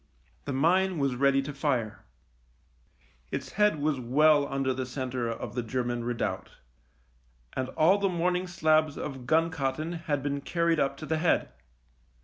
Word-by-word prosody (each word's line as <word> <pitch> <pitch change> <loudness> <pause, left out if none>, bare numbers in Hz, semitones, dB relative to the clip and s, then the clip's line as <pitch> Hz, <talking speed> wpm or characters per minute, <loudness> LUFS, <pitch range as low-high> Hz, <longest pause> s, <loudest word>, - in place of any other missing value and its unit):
The 140 - -3
mine 180 +7 +2
was 140 -3 +1
ready 135 +2 +2
to 145 +1 -6
fire. 125 -7 -2 1.3
Its - - -5
head 210 -6 +2
was 145 -2 0
well 145 +4 +4
under 135 -1 0
the 130 0 -4
centre 125 -2 -3
of 115 - -5
the 125 - -1
German 120 0 -2
redoubt, 120 -1 -3 1.0
and 130 0 -3
all 180 +6 +5
the 200 -1 +1
morning 180 +1 0
slabs 155 -3 +2
of 135 -4 -6
gun 165 +4 +3
cotton 155 +1 -2
had 160 -5 -2
been 140 0 -2
carried 170 +1 +1
up 135 0 0
to 155 - -7
the 160 0 -1
head. 165 +1 +2
145 Hz, 155 wpm, -28 LUFS, 130-160 Hz, 1.3 s, all